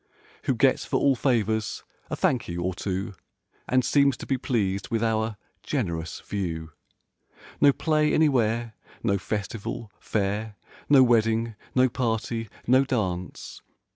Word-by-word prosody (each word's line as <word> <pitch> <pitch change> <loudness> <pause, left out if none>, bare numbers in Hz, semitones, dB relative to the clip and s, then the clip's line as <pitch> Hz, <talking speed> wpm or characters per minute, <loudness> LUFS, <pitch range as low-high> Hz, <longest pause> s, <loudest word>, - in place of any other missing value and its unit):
Who - - +2
gets - - +3
for - - 0
all 140 -1 +4
favors 110 -4 0 0.3
a - - -2
"Thank 125 -4 +1
you" 85 0 -3
or 90 +1 -1
two. 95 +3 -3 0.6
And 130 -1 +3
seems 140 -2 +3
to - - -8
be 135 - +1
pleased 100 -6 -1
with 115 0 0
our 110 -1 0 0.2
"generous" 85 - -3
view. 80 -5 -4 0.9
No 145 - +8
play 155 +1 +1
anywhere; 120 -6 +2 0.3
no 100 -4 +1
festival; 105 +2 -4
fair; 105 +1 -2 0.3
No 140 -2 +8
wedding; 115 -1 +2 0.2
no 130 0 +5
party; 115 -2 -2 0.2
no 130 +2 +5
dance. 95 -9 -3
110 Hz, 135 wpm, -26 LUFS, 100-130 Hz, 0.9 s, No